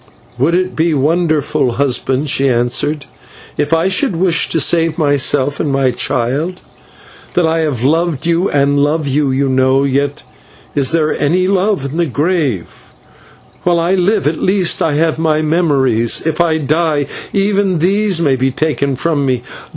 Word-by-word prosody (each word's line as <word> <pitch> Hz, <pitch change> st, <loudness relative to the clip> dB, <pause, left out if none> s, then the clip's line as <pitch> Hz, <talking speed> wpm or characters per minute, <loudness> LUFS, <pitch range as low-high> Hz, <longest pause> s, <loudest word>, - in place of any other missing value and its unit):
"Would 160 Hz, +7 st, +2 dB
it 185 Hz, +1 st, -1 dB
be 160 Hz, 0 st, +1 dB
wonderful, 150 Hz, -3 st, 0 dB
husband," 135 Hz, +1 st, 0 dB
she 135 Hz, 0 st, +2 dB
answered, 130 Hz, +4 st, -1 dB, 0.5 s
"if 145 Hz, +1 st, -2 dB
I 165 Hz, +2 st, +2 dB
should 190 Hz, +3 st, +1 dB
wish 170 Hz, -1 st, +1 dB
to 165 Hz, -, +1 dB
save 165 Hz, +1 st, +1 dB
myself 145 Hz, -2 st, +1 dB
and 150 Hz, -, -1 dB
my 135 Hz, -1 st, +1 dB
child? 140 Hz, +10 st, -2 dB, 0.7 s
That 175 Hz, -, +3 dB
I 160 Hz, +1 st, 0 dB
have 145 Hz, -7 st, -2 dB
loved 160 Hz, +1 st, 0 dB
you 170 Hz, +3 st, +1 dB
and 140 Hz, 0 st, +1 dB
love 150 Hz, +1 st, 0 dB
you, 140 Hz, +1 st, 0 dB
you 135 Hz, +1 st, 0 dB
know; 130 Hz, +1 st, +2 dB
yet 140 Hz, +1 st, -1 dB, 0.5 s
is 135 Hz, -3 st, 0 dB
there 160 Hz, -2 st, +1 dB
any 180 Hz, +6 st, +1 dB
love 195 Hz, -5 st, 0 dB
in 160 Hz, -, -5 dB
the 170 Hz, -1 st, +1 dB
grave? 145 Hz, -, -1 dB, 0.9 s
While 175 Hz, -1 st, +1 dB
I 170 Hz, +3 st, +1 dB
live, 195 Hz, +2 st, +1 dB
at 155 Hz, +2 st, -1 dB
least 185 Hz, -2 st, +1 dB
I 155 Hz, -3 st, +1 dB
have 160 Hz, +1 st, 0 dB
my 155 Hz, -1 st, +1 dB
memories; 140 Hz, -8 st, +1 dB
if 160 Hz, +1 st, 0 dB
I 165 Hz, -2 st, +2 dB
die, 155 Hz, 0 st, 0 dB, 0.3 s
even 195 Hz, -2 st, +1 dB
these 195 Hz, +2 st, +1 dB
may 145 Hz, -5 st, +2 dB
be 130 Hz, +1 st, 0 dB
taken 140 Hz, 0 st, -1 dB
from 150 Hz, +1 st, -1 dB
me. 130 Hz, -3 st, -1 dB
155 Hz, 165 wpm, -14 LUFS, 140-170 Hz, 0.9 s, That